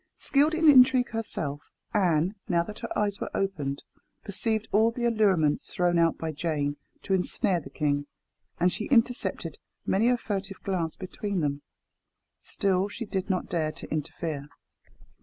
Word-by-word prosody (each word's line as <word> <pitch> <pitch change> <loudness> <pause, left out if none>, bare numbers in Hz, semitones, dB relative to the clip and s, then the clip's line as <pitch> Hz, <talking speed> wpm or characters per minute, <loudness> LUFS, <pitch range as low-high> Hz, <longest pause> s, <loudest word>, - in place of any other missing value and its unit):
Skilled 295 +3 +3
in 325 -1 +3
intrigue 255 -3 +7
herself, 155 -10 -4 0.2
Anne, 180 -3 +2 0.2
now 170 -2 +3
that 210 +4 -9
her - - -4
eyes 205 -1 0
were - - -2
opened, 150 -8 -2 0.4
perceived 220 +2 -1
all 220 +2 +4
the 240 +1 -3
allurements 195 -10 +2
thrown 175 -1 +2
out 165 0 +3
by 160 -1 -3
Jane 145 -2 -2 0.3
to 195 - -1
ensnare 185 0 +1
the 140 - -11
king, 145 0 -1 0.5
and 180 0 +3
she 210 - -3
intercepted 245 0 +1 0.3
many 220 +5 +3
a 250 - +3
furtive 195 -3 -4
glance 175 -5 -1
between 195 0 -3
them. 145 -1 -1 0.8
Still 190 0 0
she 230 +3 -6
did 195 -1 -3
not 185 -2 0
dare 160 -3 -1
to - - -8
interfere. 150 -1 -4
190 Hz, 155 wpm, -27 LUFS, 160-220 Hz, 0.8 s, intrigue